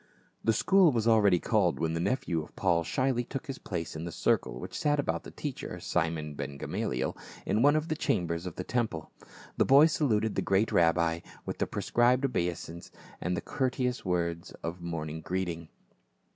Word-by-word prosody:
The 115 - +4
school 180 - +5
was 115 -3 0
already 105 -5 +5
called 100 -4 +1
when 80 0 0
the 85 - -1
nephew 85 -4 0
of 75 - -12
Paul 85 -3 +2
shyly 130 +6 0
took 135 +5 -6
his 135 -3 -6
place 85 -3 -4
in 80 - -5
the 85 - -5
circle - - 0
which - - -7
sat 145 -1 +1
about 85 -12 -1
the - - -10
teacher, - - -6
Simon 80 -3 -1
Ben 70 0 -5
Gamaliel, - - -2 0.3
in 110 - +1
one 145 +3 +5
of 155 +1 0
the 155 - -1
cham 90 - 0
bers 85 +2 -3
of 90 - -6
the 90 - -4
temple. 110 -9 -2 0.5
The - - +4
boy 140 +3 +8
saluted 115 -9 +1
the - - 0
great 100 +3 +2
rabbi 85 0 +3 0.3
with - - -5
the - - +1
prescribed 125 +3 +2
obeisance 85 -7 -3 0.3
and 90 +1 -1
the - - -2
courteous 125 -1 -1
words 85 -2 -2
of 85 +2 -4
morning 80 -2 -4
greeting. 85 -2 -3
90 Hz, 185 wpm, -30 LUFS, 85-125 Hz, 0.5 s, boy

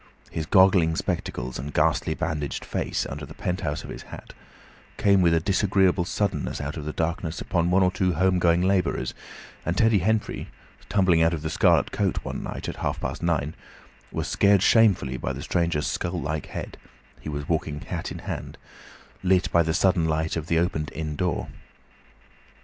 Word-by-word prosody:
His 80 -2 -3
goggling 95 -4 +5
spectacles 65 -5 -3
and 70 +2 -5
ghastly 80 - +2
bandaged 75 -5 -3
face - - -2
under 75 +2 -6
the 70 - -9
penthouse 85 -5 -2
of - - -8
his - - -7
hat, - - -11 0.6
came 100 -2 +4
with 85 -2 +4
a - - +3
disagreeable 95 0 +2
suddenness 90 -5 -2
out 70 0 -4
of 75 -3 -6
the 75 - -2
darkness 80 +1 -2
upon 85 -1 0
one 95 +2 +4
or 90 - +3
two 95 -2 +1
home 95 +3 +2
going 85 0 +3
labourers, 90 -9 +1 0.5
and 85 +2 -2
Teddy 115 -2 +4
Henfrey, 110 +4 -1 0.4
tumbling 90 -5 +3
out 85 +1 +3
of 75 - -7
the 80 - -2
"Scarlet 85 -4 +3
Coat" - - 0
one - - -4
night, - - -6
at - - -5
half - - -2
past - - -4
nine, 80 -3 0 0.6
was - - -3
scared 100 -1 +4
shamefully 95 - +4
by 65 - -3
the 70 +3 -6
stranger's 85 -2 0
skull 85 0 -2
like 75 0 -3
head - - -7 0.4
(he - - -7
was 75 -1 -4
walking 75 -2 -1
hat - - -5
in - - -5
hand) - - -5 0.6
lit 95 -1 +2
by 85 - +5
the 80 -1 0
sudden 90 0 +3
light 80 0 0
of 80 -1 -4
the 85 - +2
opened 80 -3 0
inn 75 0 -3
door. 90 +2 -1
85 Hz, 185 wpm, -25 LUFS, 75-95 Hz, 0.6 s, goggling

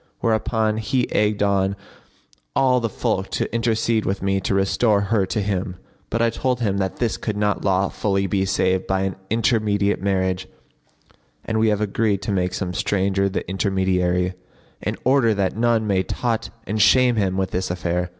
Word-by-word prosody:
Whereupon 110 -1 0
he 120 +3 0
egged 105 0 +1
on 100 -1 +1 0.8
all 130 -2 +3
the 115 -1 -2
folk 95 -1 -2
to - - -2
intercede 115 -1 +1
with 95 0 -2
me 95 0 +1
to 95 - -1
restore 100 +2 +2
her 100 -1 +1
to 105 - -1
him; 95 -1 -2 0.3
but 115 +1 0
I 115 - +2
told 125 0 -1
him 100 -4 0
that 95 -1 -1
this 120 -3 -1
could 105 -2 -3
not 105 -1 0
lawfully 95 +1 +1
be 95 +1 0
save 95 -1 0
by 95 0 +1
an 95 0 -2
intermediate 105 -3 +1
marriage, 95 -1 0 1.0
and 110 0 -1
we 110 - +3
have 105 0 0
agreed 105 -1 0
to 100 - -2
make 90 -2 0
some 90 -2 -3
stranger 100 +1 0
the 95 - -3
intermediary[FN#54] 95 -2 0 0.5
in - - -3
order 125 -4 +3
that 95 -1 0
none 115 -1 +2
may 100 -3 +2
taunt 115 +3 -2 0.2
and 105 +2 -1
shame 125 +2 +5
him 95 -3 0
with 95 -1 -1
this 95 +1 -2
affair. 90 0 -2
100 Hz, 175 wpm, -22 LUFS, 95-110 Hz, 1.0 s, shame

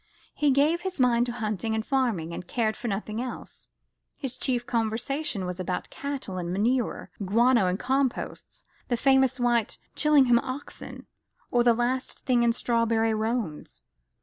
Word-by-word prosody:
He 295 - +2
gave 295 +5 +3
his 375 -5 -4
mind 245 -1 +3
to - - -2
hunting 220 -1 -2
and 220 0 -2
farming, 225 - 0
and 175 - -7
cared 220 -3 0
for 240 - -5
nothing 215 +2 -3
else. 250 - -8 0.5
His 265 -3 -5
chief 245 -2 -1
conversation 230 0 -1
was 180 0 -5
about 180 0 -3
cattle 270 -10 -4
and 175 -1 -3
manure, 230 +6 0
guano 230 +1 +4
and 180 +1 0
composts, 265 +2 -2 0.2
the 240 - 0
famous 265 0 +3
white 240 -3 +1 0.2
Chillingham 275 -6 +5
oxen, 260 +3 -7 0.5
or 240 -1 +3
the 235 -1 +5
last 250 +2 -2
thing 250 -2 +3
in 235 0 +4
strawberry 230 -1 +1
roans. 220 -7 -3
240 Hz, 150 wpm, -27 LUFS, 220-260 Hz, 0.5 s, Chillingham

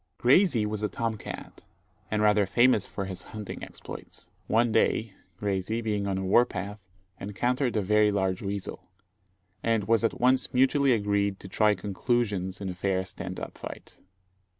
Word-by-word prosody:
Graysie 130 - +4
was 105 0 -3
a 105 - 0
tom 115 +1 -2
cat, 100 - -9 0.5
and 105 0 0
rather 105 -1 +4
famous 120 -1 +3
for 100 - -4
his 95 -1 -5 0.2
hunting 105 -2 -6
exploits. - - -10 0.2
One 115 +1 +3
day, 110 0 +2 0.3
Graysie, 100 +2 -1
being 105 -2 -1
on 95 - 0
the 95 - -2
war 95 +6 +5
path, 100 -2 -7 0.3
encountered 120 +6 -1
a 105 - +1
very 105 +2 +4
large 95 -2 0
weasel, 100 -2 -5 0.7
and 115 -2 +1
it - - -9
was 115 0 +4
at 115 - 0
once 130 +1 +2
mutually 135 +1 +4
agreed 100 -2 0
to - - -8
try 105 +2 +3
conclusions 100 -1 -1
in 100 - -4
a - - -3
fair 95 +1 -1
stand 90 - -6
up - - -8
fight. - - -9
105 Hz, 170 wpm, -28 LUFS, 95-115 Hz, 0.7 s, war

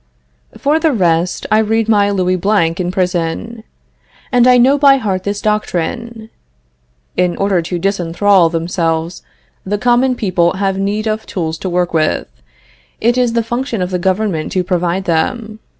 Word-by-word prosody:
For 295 +3 +1
the 320 -1 +2
rest, 175 -4 0
I 215 - +4
read 220 0 +1
my 205 -2 +3
Louis 185 -2 0
Blanc 185 -3 +1
in 180 -1 -1
prison, 185 +4 -2 0.7
and 245 -1 +4
I 250 0 +6
know 260 +3 +5
by 275 -1 +6
heart 195 -7 -2
this 205 0 -2
doctrine: 220 +2 -3 0.8
"In 180 -1 0
order 195 -3 +1
to 175 +2 -4
disenthrall 185 -1 +2
themselves, 165 0 -2 0.4
the 205 +2 -2
common 245 +3 +2
people 185 -6 +1
have 195 0 -1
need 205 +2 -1
of 220 0 -2
tools 160 -3 -3
to 190 - -4
work 175 0 -1
with; 155 -1 0 0.7
it 235 +2 +2
is 250 -2 +1
the 235 -1 +1
function 240 0 -3
of 180 0 -2
the 180 - -1
government 190 -3 -1
to 185 - +1
provide 180 +1 -1
them." 215 +6 -2
195 Hz, 160 wpm, -15 LUFS, 175-225 Hz, 0.8 s, I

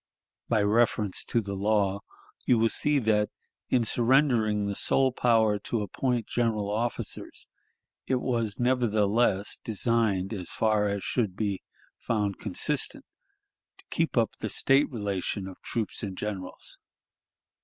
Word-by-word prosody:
By 110 -3 +3
reference 105 -2 +1
to 115 - +1
the 100 -2 -5
law, 100 0 +1 0.5
you 125 - +5
will 115 0 +3
see 150 +4 +1
that, 105 -4 +2 0.4
in 125 -2 +3
surrendering 115 -3 +3
the 100 0 -2
sole 135 +5 +2
power 110 -4 +3
to 110 +1 -2
appoint 120 +4 -1
general 110 -4 0
officers, 115 +3 -3 0.6
it 130 - +2
was 115 -5 -1
nevertheless 110 -4 +2
designed, 110 -2 0
as 90 -5 -5
far 110 -2 +1
as 100 -1 -3
should 105 -7 -1
be 100 -3 -2 0.4
found 105 -3 -1
consistent, - - -2 0.7
to - - -22
keep - - 0
up - - +3
the - - -3
State 135 +2 +3
relation 100 -4 -3
of 95 - -11
troops 115 -3 -3
and 95 -3 -5
generals. 95 -3 -6
110 Hz, 135 wpm, -28 LUFS, 100-120 Hz, 0.7 s, you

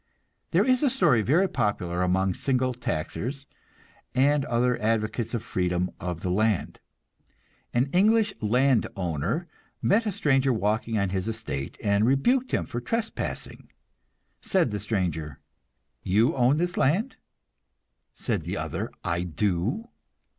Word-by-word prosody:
There - - +3
is 255 -1 +3
a 290 - +4
story 150 - +3
very 160 - +3
popular 90 - -1
among 95 +1 +2
single 130 +3 0
taxers 120 - -4 0.7
and 140 +2 +3
other 125 +1 +1
advocates 110 +2 0
of 115 - -3
freedom 90 -3 -1
of 90 -2 -4
the 90 - -1
land. 105 0 0 0.9
An 120 +2 +2
English 215 +3 +4
land 125 +2 +3
owner 90 - -2 0.3
met 220 +3 +2
a - - +1
stranger 135 -8 +2
walking 110 0 0
on 100 -2 +1
his 95 +1 -2
estate, 110 -12 -4
and 100 +2 +3
rebuked 245 - +2
him - - 0
for 120 - -5
trespassing. 230 - -4 0.7
Said 180 - +1
the 105 - -2
stranger, 85 - -2 0.6
"You 105 +6 +2
own 130 +2 +3
this 175 +2 -1
land?" 195 - +1 1.0
Said - - -2
the - - -4
other, - - -3
"I 85 +1 -1
do." 95 - -1
115 Hz, 130 wpm, -26 LUFS, 95-145 Hz, 1.0 s, a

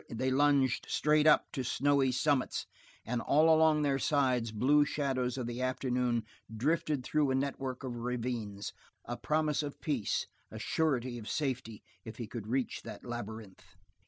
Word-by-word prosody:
They 130 +3 -1
lunged 140 -2 +3
straight 150 0 +3
up 150 - +5
to 135 - -3
snowy 135 +1 +2
summits, 135 +1 0 0.4
and 120 +1 -1
all 155 +5 +5
along 155 -1 +4
their 140 -2 +1
sides 130 -7 +1
blue 135 +7 +4
shadows 135 -4 -1
of 125 - -2
the 120 +1 -4
afternoon 125 -2 0 0.3
drifted 145 +3 0
through 150 +2 +1
a 130 - +1
network 135 -1 -2
of 130 -2 -4
ravines 115 -4 -3 0.3
a 120 - -4
promise 155 +2 0
of 145 -2 -6
peace, 135 -10 -1 0.2
a - - -8
surety 130 -6 0
of 110 - -8
safety 125 -7 -3 0.2
if 110 - -9
he 120 - -4
could 110 -1 -7
reach 130 +2 -1
that - - -9
labyrinth. 110 -4 -7
130 Hz, 160 wpm, -32 LUFS, 120-145 Hz, 0.4 s, up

